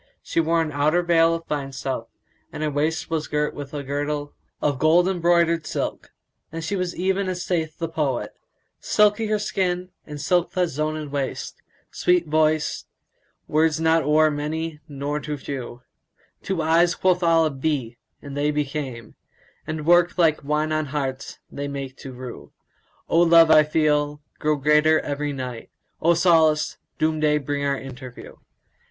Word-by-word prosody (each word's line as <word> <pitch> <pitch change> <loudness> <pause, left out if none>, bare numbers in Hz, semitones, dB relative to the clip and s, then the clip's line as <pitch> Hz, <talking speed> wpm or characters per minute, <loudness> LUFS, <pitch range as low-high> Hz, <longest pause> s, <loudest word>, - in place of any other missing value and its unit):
She - - -1
wore 165 0 +2
an 155 - -4
outer 155 +5 +2
veil 165 -1 +4
of 165 0 -7
fine 140 -3 -4
stuff, 135 0 -4 0.4
and 155 - -5
her 155 - 0
waist 155 +3 -1
was 160 -1 -1
girt 150 0 -1
with 145 -1 -8
a 145 -1 -5
girdle 145 +1 -3 0.3
of 145 -3 0
gold 165 +4 +4
embroidered 170 -3 +2
silk; - - -4 0.4
and 165 0 -5
she 180 +5 -2
was 180 -2 -2
even 190 +1 0
as 180 -1 -4
saith 160 -3 -2
the 165 - -2
poet, 150 -6 -2 0.5
"Silky 210 +1 +2
her 215 0 +1
skin 185 -3 -1 0.2
and 150 -1 -7
silk 175 +4 +1
that 180 -2 +1
zoned 155 0 -3
waist; 140 -2 -4 0.2
* - - -35
Sweet 180 -1 +2
voice; 155 0 +1 0.6
words 155 +1 +2
not 160 0 +3
o'er 155 +1 +3
many 155 +2 -3
nor 145 0 -3
too 150 +1 -5
few: 130 -3 -7 0.6
Two 185 -4 -2
eyes 170 +2 +3
quoth 185 -1 +2
Allah 165 -2 +3
'Be,' 135 -4 -2 0.3
and 140 -1 -8
they 145 +1 +1
became; 140 -6 -4 0.3
* - - -34
And 155 -1 -4
work 175 +1 +4
like 160 -4 +3
wine 150 +2 0
on 155 -1 0
hearts 135 -2 -4
they 140 0 -4
make 135 -2 -6
to 135 - -9
rue: 125 -1 -9 0.6
O 165 - +3
love 165 -1 +6
I 155 - +8
feel! 150 -1 +1 0.2
grow 155 0 +1
greater 150 +2 +4
every 145 0 -3
night: 125 -4 -6 0.2
* - - -45
O 170 +1 +4
solace! 160 -3 +3 0.2
Doom 155 0 0
day 150 -1 +3
bring 145 0 -3
our 140 -1 0
interview." 130 -2 -10
155 Hz, 170 wpm, -23 LUFS, 145-165 Hz, 0.6 s, I